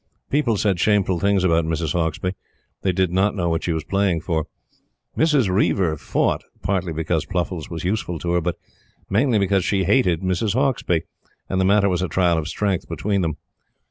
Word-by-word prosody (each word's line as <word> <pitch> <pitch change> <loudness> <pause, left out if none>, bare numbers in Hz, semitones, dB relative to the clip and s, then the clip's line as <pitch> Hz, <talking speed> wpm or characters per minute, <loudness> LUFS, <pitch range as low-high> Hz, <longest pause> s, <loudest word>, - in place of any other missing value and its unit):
People 130 -7 +2
said 100 -3 +1
shameful 95 -3 +2
things 100 0 +2
about 85 -2 +3
Mrs. 80 -1 -2
Hauksbee. 85 +2 -1 0.5
They 95 - +1
did 90 -1 +1
not 95 +4 +2
know 85 -3 0
what 80 0 -1
she 85 - -1
was 80 -2 -2
playing 95 -3 0
for. 80 -2 -2 0.7
Mrs. 150 -8 +3
Reiver 95 -3 +1
fought, 75 - 0 0.2
partly 95 -2 -1
because 80 0 -1
Pluffles 90 -3 -3
was 85 -1 -5
useful 90 -2 -1
to 85 +2 -3
her, 90 0 +2
but 85 +1 -2 0.5
mainly 115 +3 +3
because 100 -1 +2
she 95 +1 +1
hated 90 -4 +2
Mrs. 95 +3 0
Hauksbee, 125 - +1 0.4
and 95 0 0
the - - +2
matter 100 +1 +4
was 90 -2 0
a 95 - 0
trial 85 0 +2
of 80 - -4
strength 95 0 -2
between 100 -1 -1
them. 80 -4 -2
95 Hz, 185 wpm, -22 LUFS, 85-100 Hz, 0.7 s, matter